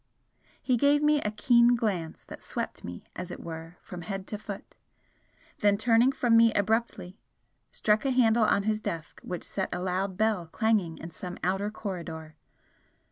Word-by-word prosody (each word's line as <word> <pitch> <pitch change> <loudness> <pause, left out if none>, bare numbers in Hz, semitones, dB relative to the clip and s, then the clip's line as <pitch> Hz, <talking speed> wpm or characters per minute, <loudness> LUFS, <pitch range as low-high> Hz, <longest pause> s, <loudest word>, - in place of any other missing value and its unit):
He 250 -2 +1
gave 290 +4 +4
me 300 -1 +4
a 210 - -1
keen 235 +3 +4
glance 190 -9 -2
that - - -10
swept - - -5
me 90 0 -7
as 180 0 -5
it - - -7
were 165 +1 -8
from 180 -1 -8
head 195 +2 -5
to 210 - -3
foot 205 -2 -8 0.9
then 205 -1 +4
turning 230 +3 +4
from 245 -3 +2
me 230 0 +7
abruptly, 210 -2 -1 0.5
struck 210 0 +2
a 275 - +1
handle 235 -3 +4
on 200 - +2
his 215 +1 0
desk 165 -6 -5
which 180 -1 -5
set 190 - -2
a 180 - -2
loud 185 +1 -2
bell 215 -6 +1
clanging 205 -3 +1
in 165 - -8
some 180 +2 -7
outer 195 +3 0
corridor. 170 -7 -6
205 Hz, 170 wpm, -28 LUFS, 180-230 Hz, 0.9 s, me